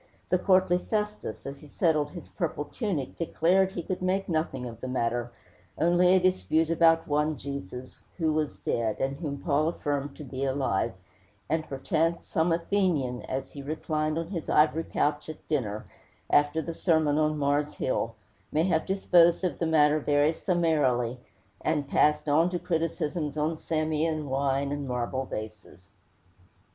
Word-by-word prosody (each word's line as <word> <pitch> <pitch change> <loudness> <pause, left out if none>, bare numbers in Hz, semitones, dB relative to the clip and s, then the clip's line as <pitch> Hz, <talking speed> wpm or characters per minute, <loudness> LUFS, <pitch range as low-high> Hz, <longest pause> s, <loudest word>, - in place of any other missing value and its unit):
The 180 - +3
courtly 185 -2 +3
Festus, 210 - -3
as 140 0 -6
he 150 - -13
settled 155 -1 +1
his 175 +1 -10
purple 160 -5 -3
tunic, 175 - -3
declared 185 +3 +2
he 175 - -4
could 185 +2 -4
make 185 +1 0
nothing 155 -6 -1
of 115 -2 -8
the - - -4
matter, 120 -1 -1 0.5
only 175 +2 +4
a - - +5
dispute 165 - +1
about 165 0 +4
one 150 +1 +1
Jesus, 130 -3 -7 0.2
who 160 -3 +1
was 155 -3 -1
dead, 110 -2 -1
and 135 +1 -1
whom 145 -3 -4
Paul 155 -1 +2
affirmed 145 -4 -2
to - - -9
be 135 0 -5
alive; 130 -9 0 0.5
and 155 +1 -1
perchance 160 +5 0
some 165 +2 +1
Athenian, 165 -8 0
as 135 0 -4
he 140 - -8
reclined 155 +1 -2
on 165 0 -3
his 170 -5 -5
ivory 155 +2 +3
couch 150 +1 -1
at 155 - -10
dinner, 110 -9 -2 0.5
after 145 +2 +3
the 165 - -4
sermon 160 -3 +2
on 155 0 +1
Mars 145 +1 0
Hill, 115 -3 -1 0.4
may 155 - +2
have 165 -3 +1
disposed 175 -3 +4
of 180 - -1
the 165 - 0
matter 155 -1 +4
very 145 +1 +2
summarily, 145 -9 +1 0.4
and 150 -3 0
passed 150 +2 +2
on 160 +4 +4
to 180 - -2
criticisms 165 -3 -2
on 155 +2 0
Samian 155 -1 -1
wine 135 +1 0
and 145 -1 -3
marble 125 +1 -2
vases. 105 -6 -8
155 Hz, 160 wpm, -28 LUFS, 140-165 Hz, 0.5 s, a